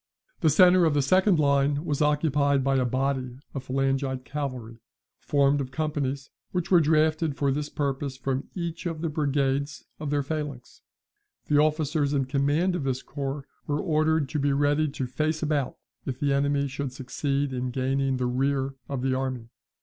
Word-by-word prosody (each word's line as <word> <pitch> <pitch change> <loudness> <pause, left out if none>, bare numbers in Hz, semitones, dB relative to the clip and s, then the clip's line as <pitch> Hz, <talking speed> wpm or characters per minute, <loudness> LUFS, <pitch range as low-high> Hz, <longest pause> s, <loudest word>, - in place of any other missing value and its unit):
The 160 - +3
centre 180 +3 +6
of 155 -2 +2
the 145 - +3
second 185 +5 +4
line 140 +1 +2
was 150 -3 -1
occupied 145 -2 +2
by 135 0 +2
a 130 - +2
body 130 0 -1 0.2
of 130 -2 -6
phalangite 135 -1 -1
infantry, 125 -6 -4 0.4
formed 140 0 +2
of 130 - -4
companies, 140 -2 -2 0.2
which 180 0 -2
were 180 - +7
drafted 155 0 +2
for 140 -1 +1
this 145 +2 -2
purpose 140 -1 -2
from 135 0 -2
each 170 -1 -4
of 165 -2 -4
the 165 - -1
brigades 140 -1 -1
of 150 - -4
their 145 0 +1
phalanx. 145 -3 -5 0.7
The 145 - +4
officers 150 -1 +1
in 135 -1 +1
command 145 +7 +1
of 170 - -2
this 130 -1 -1
corps 140 0 -4 0.2
were 145 0 0
ordered 155 -2 +1
to 150 - -2
be 140 0 +2
ready 145 +2 +2
to 140 -2 -3
face 155 +5 -1
about, 150 -4 -1 0.3
if 130 -1 -3
the 140 -1 +1
enemy 140 0 +1
should 140 0 -4
succeed 140 +1 -2
in 125 0 -2
gaining 135 +1 0
the 125 - -1
rear 135 +2 0 0.2
of 135 -3 -3
the 135 -1 +1
army. 130 -3 -3
140 Hz, 175 wpm, -26 LUFS, 135-150 Hz, 0.7 s, were